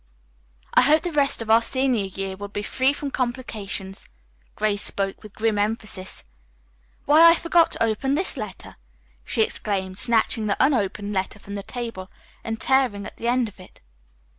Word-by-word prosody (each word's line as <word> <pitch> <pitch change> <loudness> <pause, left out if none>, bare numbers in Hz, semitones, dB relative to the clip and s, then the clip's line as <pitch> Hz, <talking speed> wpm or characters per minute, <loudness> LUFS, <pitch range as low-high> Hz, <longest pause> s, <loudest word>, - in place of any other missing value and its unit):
"I - - +6
hope 300 +5 +4
the 350 - -2
rest 280 -6 +1
of 220 - -2
our 225 +1 +6
senior 255 -3 0
year 195 0 -5
will 205 +1 -7
be 205 +1 -5
free 260 +5 +1
from 285 -1 -5
complications." 220 -7 -4 0.5
Grace 210 -1 0
spoke 195 -1 0
with 215 -2 -13
grim 220 -1 0
emphasis. 210 -3 -3 0.8
"Why, 320 +4 +8
I 335 - +6
forgot 335 0 +3
to - - 0
open 245 +5 0
this 365 +5 0
letter!" 215 -7 -8 0.5
she 220 - +2
exclaimed, 190 -3 -3
snatching 225 -2 +2
the 200 - 0
unopened 210 -6 +1
letter 190 +1 -2
from 200 0 -10
the 200 - -4
table 230 -4 -6 0.3
and 225 0 -4
tearing 255 -7 +1
at - - -10
the 235 - -4
end 245 0 +2
of 205 -2 -13
it. 185 - -15
220 Hz, 170 wpm, -23 LUFS, 200-260 Hz, 0.8 s, Why